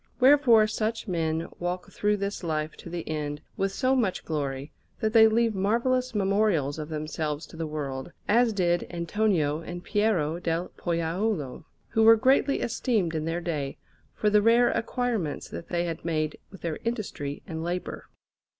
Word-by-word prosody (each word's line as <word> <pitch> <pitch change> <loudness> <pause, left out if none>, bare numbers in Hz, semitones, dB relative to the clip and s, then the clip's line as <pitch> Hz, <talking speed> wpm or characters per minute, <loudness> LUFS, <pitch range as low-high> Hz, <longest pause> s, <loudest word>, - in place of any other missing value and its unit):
Wherefore 255 -5 +6
such 220 +1 -2
men 165 -2 -1
walk 175 +1 -3
through 210 0 +1
this 200 -1 -3
life 155 -2 -2
to - - -10
the 170 -1 -5
end 150 -1 -3 0.2
with 195 0 0
so 260 +6 +1
much 220 -8 0
glory, 140 -2 -3 0.3
that 220 -1 0
they 220 -1 +8
leave 230 0 +2
marvellous 240 +5 +1
memorials 195 -8 +1
of 150 0 -5
themselves 155 0 -3
to - - -14
the 160 -1 -3
world, 140 -1 -4 0.2
as 235 +2 +4
did 175 -4 +1
Antonio 170 -4 0
and 175 +1 -7
Piero 180 -6 +1
del 170 0 -1
Pollaiuolo, 170 - -2 0.2
who 225 - +1
were 225 +1 +9
greatly 270 +4 +3
esteemed 220 -8 0
in 155 -1 -2
their 165 +2 -2
day 150 -5 -3 0.4
for 210 - +1
the 210 0 +5
rare 235 +3 +5
acquirements 230 - -2
that - - -7
they 175 -1 0
had 165 -2 -4
made 155 -2 -1
with 195 - -13
their 165 -3 -3
industry 210 - -4
and 160 -4 -5
labour. 175 +2 -4
175 Hz, 165 wpm, -27 LUFS, 160-220 Hz, 0.4 s, were